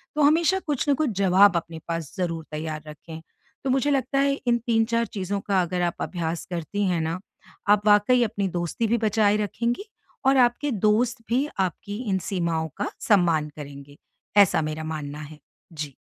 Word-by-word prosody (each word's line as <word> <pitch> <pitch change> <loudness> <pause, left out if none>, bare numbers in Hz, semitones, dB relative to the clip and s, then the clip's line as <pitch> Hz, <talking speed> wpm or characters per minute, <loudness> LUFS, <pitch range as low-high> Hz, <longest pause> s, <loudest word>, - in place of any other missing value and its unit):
तो 300 - +1
हमेशा 335 +5 +4
कुछ 290 0 -1
न 285 - +6
कुछ 305 -3 0
जवाब 190 -1 +5
अपने 165 -1 -5
पास 165 -3 -4
ज़रूर 165 -3 -2
तैयार 155 0 -4
रखें। 160 +1 -10 0.4
तो 270 - -1
मुझे 270 +2 +2
लगता 275 0 +1
है 280 0 +3
इन 235 0 +4
3-4 230 0 +2
चीज़ों 200 -1 -3
का 190 -2 +3
अगर 180 +1 -2
आप - - -29
अभ्यास 170 -2 -3
करती 185 +5 -2
हैं 175 -2 +1
ना, 165 +3 -2 0.5
आप 205 0 +4
वाक़ई 210 +4 +5
अपनी 205 -3 -1
दोस्ती 175 +6 -2
भी 235 +2 +2
बचाए 210 -1 +3
रखेंगी 235 - -2 0.4
और 270 0 +5
आपके 250 +3 +3
दोस्त 220 +3 +2
भी 265 +5 +1
आपकी 190 +3 -2
इन 190 - +2
सीमाओं 170 -4 -1
का 205 - -2 0.2
सम्मान 165 -7 +3
करेंगे। 145 0 -10 0.4
ऐसा 200 -5 +6
मेरा 155 +1 -4
मानना 150 -2 -5
है। 150 0 -10 0.3
जी। 150 -3 -6
195 Hz, 175 wpm, -25 LUFS, 160-235 Hz, 0.5 s, न